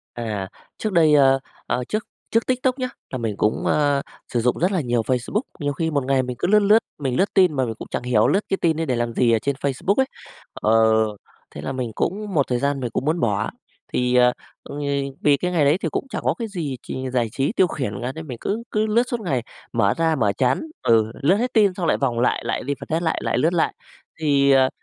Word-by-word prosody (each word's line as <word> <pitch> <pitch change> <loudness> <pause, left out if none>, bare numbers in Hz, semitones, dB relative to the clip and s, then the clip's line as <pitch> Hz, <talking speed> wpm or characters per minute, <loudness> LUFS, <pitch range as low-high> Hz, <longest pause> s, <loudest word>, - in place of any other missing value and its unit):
À. 105 -5 -3 0.3
Trước 215 - -2
đây, 160 -4 +5
ơ, 135 -2 +5 0.3
ơ 125 - -1
trước 215 0 -2 0.3
trước 230 0 +1
TikTok 255 +1 0
nhớ 255 -1 -1 0.2
là 130 - -3
mình 110 -4 -3
cũng, 105 - 0
ơ, 145 -2 +2 0.3
sử 120 - +1
dụng 125 +2 +1
rất 180 +4 +1
là 185 - +1
nhiều 120 -4 0
Facebook. 130 - -1 0.2
Nhiều 145 -1 0
khi 160 +3 -1
một 140 -3 0
ngày 135 0 +2
mình 125 -1 -5
cứ - - 0
lướt 210 +2 +6
lướt, 210 +1 +5 0.2
mình 135 -4 -2
lướt 195 +2 +1
tin 180 -6 +4
mà 130 - +2
mình 115 -2 -3
cũng - - -8
chẳng - - -2
hiểu 120 -3 +3
lướt 195 - +3
cái 195 - +1
tin 165 -2 +2
đấy 165 0 -2
để 130 -4 0
làm 120 0 -1
gì 120 0 +3
ở 115 - +4
trên 140 +4 -2
Facebook 140 +8 0
ấy. 265 +3 +2 0.5
Ờ, 110 - +2 0.8
thế - - -6
là 135 - -4
mình 130 -3 -3
cũng 205 - -2
một 140 -3 +3
thời 125 - +1
gian 140 +1 0
mình 125 -2 -3
cũng 120 - -2
muốn 160 +4 0
bỏ, 105 -4 0 0.4
thì, 125 0 +1
ờ, 125 0 +5 0.3
ôi, 145 +1 -7 0.4
vì 145 -1 +5
cái 180 +5 -2
ngày 165 -4 +3
đấy 145 +5 +3
thì 165 - 0
cũng 215 - -3
chẳng - - -4
có - - +2
cái 230 -2 -3
gì 165 -10 -4
trì 130 0 -5
giải 120 -2 0
trí 140 +7 0
tiêu 190 - +3
khiển 130 - -3
cả, 125 +2 -2
nên 160 0 -7
mình 125 -5 -7
cứ 220 +3 -2
cứ 215 0 +1
lướt 220 +2 +3
suốt 240 - -2
ngày. 140 - -1 0.3
Mở 100 -4 +2
ra, 165 -1 +2
mở 105 -7 +2
chán, 125 +5 +1 0.2
ừ, 110 -1 +3
lướt 170 +8 +4
hết 245 +3 -1
tin 205 -4 +4
xong 180 -2 -2
lại - - +3
vòng 125 -4 -1
lại, 125 - +1
lại - - -2
refresh 145 +4 -2
lại, 160 - 0
lại - - 0
lướt 165 +3 +2
lại. 175 - +1 0.5
Thì, 140 -3 +3
ờ, 130 -1 +5
140 Hz, 250 wpm, -22 LUFS, 125-180 Hz, 0.8 s, lướt